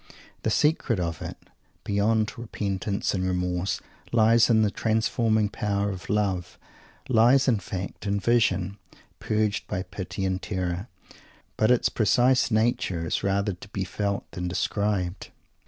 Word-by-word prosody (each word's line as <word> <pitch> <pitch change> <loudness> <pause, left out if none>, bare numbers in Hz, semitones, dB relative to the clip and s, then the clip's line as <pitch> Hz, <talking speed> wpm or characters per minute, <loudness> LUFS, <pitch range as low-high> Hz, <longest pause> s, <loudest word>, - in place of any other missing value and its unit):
The - - 0
secret 135 - +2
of 85 -2 -3
it, - - -6 0.5
beyond 110 +2 +1
repentance 100 -3 -2
and 95 -2 -1
remorse, 90 0 -1 0.3
lies 115 +1 +5
in 110 -2 +5
the 105 - +1
transforming 110 0 +1
power 100 0 -1
of 95 -2 -8
"love;" 95 -4 -1 0.5
lies, 130 +2 +5
in 115 -5 +3
fact, 95 +2 -6
in 100 0 +1
"vision" 100 -4 +1 0.4
purged 105 -1 0
by 95 - -2
pity 95 +1 -5
and 95 0 -1
terror; 90 +1 -3 0.7
but 110 - +2
its 125 -1 +4
precise 125 +5 +3
nature 110 -7 +1
is - - -1
rather 100 +1 0
to 90 +3 -12
be 100 -1 -3
felt 100 +2 -2
than 90 0 -4
described. 95 0 -1
100 Hz, 140 wpm, -26 LUFS, 95-110 Hz, 0.7 s, lies